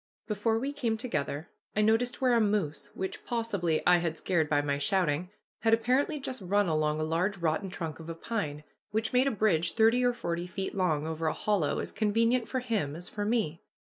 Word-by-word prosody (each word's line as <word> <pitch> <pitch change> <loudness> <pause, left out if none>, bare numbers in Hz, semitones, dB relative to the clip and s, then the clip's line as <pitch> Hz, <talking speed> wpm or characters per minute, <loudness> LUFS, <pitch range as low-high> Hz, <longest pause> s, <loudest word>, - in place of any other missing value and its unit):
Before 220 +1 0
we 275 +5 -2
came 235 -6 -1
together 155 - -3 0.3
I 215 - +3
noticed 225 +3 +2
where 255 -2 +4
a 235 - +4
moose, 205 -8 0
which 190 0 -4
possibly 200 -9 -1
I 180 0 +7
had 165 -2 -2
scared 160 -5 0
by 145 - +3
my 140 -1 0
shouting, 175 +1 +1 0.3
had 225 0 +4
apparently 260 +6 +1
just 260 -4 -5
run 200 +2 +2
along 155 -2 +1
a - - 0
large 175 +6 0
rotten 170 +3 0
trunk 165 -4 -5
of 165 0 -9
a 165 - -4
pine, 160 -6 -3 0.3
which 220 +2 -1
made 255 +2 +4
a - - +4
bridge 190 -8 +1
thirty 230 +2 +4
or 245 0 +3
forty 170 -5 -3
feet 190 +1 -4
long 165 -6 +1
over 160 0 -2
a 155 - +1
hollow, 200 -8 0
as - - -3
convenient 230 +3 +1
for 260 - -1
him 210 - -1
as 175 +2 -7
for 205 -1 -3
me. 210 -8 0
195 Hz, 205 wpm, -30 LUFS, 160-230 Hz, 0.3 s, I